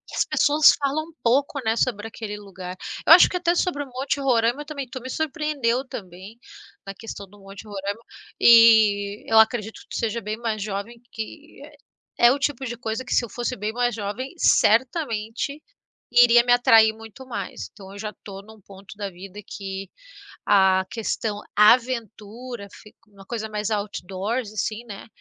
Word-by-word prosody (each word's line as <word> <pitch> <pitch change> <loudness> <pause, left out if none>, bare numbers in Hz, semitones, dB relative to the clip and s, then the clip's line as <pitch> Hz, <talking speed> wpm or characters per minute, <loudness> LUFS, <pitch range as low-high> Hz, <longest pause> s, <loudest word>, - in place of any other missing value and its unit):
As - - +2
pessoas 295 +1 +5
falam 290 +2 -1
um 330 - -17
pouco, 275 +4 +1
né, 220 0 +1
sobre 225 -3 -1
aquele 210 -2 -7
lugar. 185 -3 -9 0.3
Eu 320 - +9
acho 350 - +8
que 360 - -2
até 345 -1 +1
sobre 315 -5 -1
o - - -12
Monte 260 +2 -3
Roraima 240 +1 +1
também. 280 -4 -6
Tu 255 +1 -7
me 260 - -8
surpreendeu 285 -5 -1
também 190 +3 -10 0.5
na 195 - -6
questão 210 -2 -9
do 205 +2 -19
Monte 195 +2 -12
Roraima 200 +1 -5 0.4
e 220 -3 +5
eu 225 - +5
acredito 220 -1 +1
que - - -20
tu - - -5
seja 230 +1 -2
bem 215 +2 -4
mais 220 -3 -3
jovem, 210 +3 -6
que 290 +8 -9 0.6
é 240 0 +6
o 280 - 0
tipo 275 -1 -2
de 240 -1 -5
coisa 225 +1 -4
que 245 - -4
se - - +3
eu - - -13
fosse 240 +4 -3
bem 210 +2 -3
mais 245 -1 0
jovem, 225 - -5
certamente 240 +2 +1 0.5
iria 240 0 +6
me 245 - +4
atrair 225 -2 +5
muito 225 +4 -12
mais. 200 -7 -6
Então 195 -2 -13
eu 200 - -11
já 210 0 -5
estou 195 -2 -11
num 220 0 -16
ponto 195 0 -14
da 200 -1 -5
vida 190 +3 -11
que 195 -1 -7 0.6
a 190 -1 +4
questão 220 -2 -3 0.2
aventura 230 0 +1
fica 215 - -16
uma 195 -1 -16
coisa 220 0 -4
mais 210 0 -3
outdoors 205 +2 -3
assim, 215 +2 -3
né? 200 -1 -10
225 Hz, 175 wpm, -23 LUFS, 205-250 Hz, 0.6 s, Eu